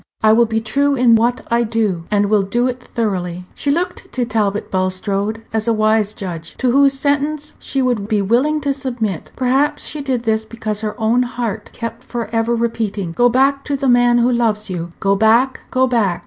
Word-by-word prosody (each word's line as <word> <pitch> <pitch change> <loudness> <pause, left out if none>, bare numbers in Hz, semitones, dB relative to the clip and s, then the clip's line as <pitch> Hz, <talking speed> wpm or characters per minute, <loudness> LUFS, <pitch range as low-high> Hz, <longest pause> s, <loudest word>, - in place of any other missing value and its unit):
I 215 0 +6
will 235 +1 +4
be 225 0 0
true 280 +6 +1
in 245 -2 +4
what 235 +2 +2
I 235 0 +3
do, 215 -7 -1
and 205 -1 +2
will 210 0 +3
do 235 +6 0
it 255 0 -2
thoroughly." 180 -7 -3
She 285 - -2
looked 340 +6 -2
to 250 -1 0
Talbot 210 -2 -1
Bulstrode 195 +3 -1
as 220 0 0
a 230 - +3
wise 215 -1 +2
judge, 170 -4 -6
to 255 -2 +1
whose 275 +1 +4
sentence 290 +2 -1
she 270 -1 -2
would 240 -5 0
be 215 -2 +1
willing 255 +10 +1
to 280 -1 0
submit. 240 - -3
Perhaps 270 +4 +1
she 300 - -3
did 260 -4 -2
this 220 -1 0
because 220 -2 -4
her 215 +1 -4
own 225 +3 +2
heart 240 -3 -3
kept 230 +1 -6
for 240 -2 -5
ever 225 +1 +1
repeating, 220 -6 -2
"Go 245 +8 +3
back 275 +3 +2
to 285 - -1
the 275 0 -1
man 245 -1 +4
who 240 +1 +3
loves 220 -4 0
you. 175 -1 -4
Go 195 0 +2
back, 230 +6 +3
go 260 0 +2
back! 220 -8 +1
230 Hz, 205 wpm, -18 LUFS, 210-255 Hz, -, I